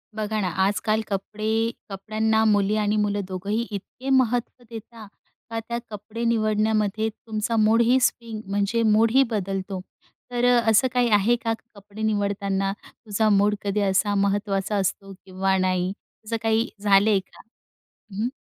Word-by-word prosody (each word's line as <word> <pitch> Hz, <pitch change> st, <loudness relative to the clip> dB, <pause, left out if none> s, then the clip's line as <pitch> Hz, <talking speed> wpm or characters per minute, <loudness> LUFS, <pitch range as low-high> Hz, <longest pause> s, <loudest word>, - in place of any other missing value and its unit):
बघा 215 Hz, 0 st, -2 dB
ना, 185 Hz, -, 0 dB, 0.2 s
आजकाल 215 Hz, +2 st, 0 dB
कपडे 215 Hz, +2 st, -3 dB, 0.4 s
कपड्यांना 220 Hz, +3 st, 0 dB
मुली 205 Hz, -1 st, +3 dB
आणि 210 Hz, 0 st, +1 dB
मुलं 205 Hz, -1 st, 0 dB
दोघंही 200 Hz, +5 st, -2 dB
इतके 225 Hz, +6 st, -7 dB
महत्त्व 250 Hz, -1 st, +1 dB
देता 225 Hz, -1 st, -10 dB, 0.4 s
का, 225 Hz, 0 st, -3 dB
त्या 235 Hz, +1 st, -4 dB
कपडे 215 Hz, +2 st, -7 dB
निवडण्यामध्ये 215 Hz, -1 st, +1 dB
तुमचा 220 Hz, +1 st, -4 dB
मूडही 230 Hz, +4 st, +4 dB
स्विंग 230 Hz, -3 st, -1 dB
म्हणजे 205 Hz, +3 st, 0 dB
मूडही 225 Hz, +5 st, +4 dB
बदलतो. 195 Hz, -2 st, -3 dB, 0.5 s
तर 245 Hz, 0 st, 0 dB
अ, 245 Hz, -1 st, +5 dB
असं 220 Hz, +4 st, +4 dB
काही 245 Hz, -1 st, +2 dB
आहे 210 Hz, +3 st, +4 dB
का, 230 Hz, -1 st, -2 dB
की 225 Hz, -, -12 dB
कपडे 200 Hz, +1 st, -11 dB
निवडताना 200 Hz, -2 st, 0 dB
तुझा 215 Hz, -1 st, -2 dB
मूड 205 Hz, 0 st, +3 dB
कधी 200 Hz, 0 st, -1 dB
असा 200 Hz, +1 st, +1 dB
महत्त्वाचा 200 Hz, 0 st, 0 dB
असतो 195 Hz, 0 st, -2 dB
किंवा 190 Hz, 0 st, 0 dB
नाही, 185 Hz, 0 st, 0 dB, 0.3 s
असं 230 Hz, +1 st, -2 dB
काही 225 Hz, +1 st, +2 dB, 0.2 s
झालंय 200 Hz, 0 st, +4 dB
का? 190 Hz, -, -17 dB, 0.7 s
हं, 205 Hz, +3 st, -3 dB
हं. 240 Hz, -, +1 dB
215 Hz, 145 wpm, -24 LUFS, 200-225 Hz, 0.7 s, अ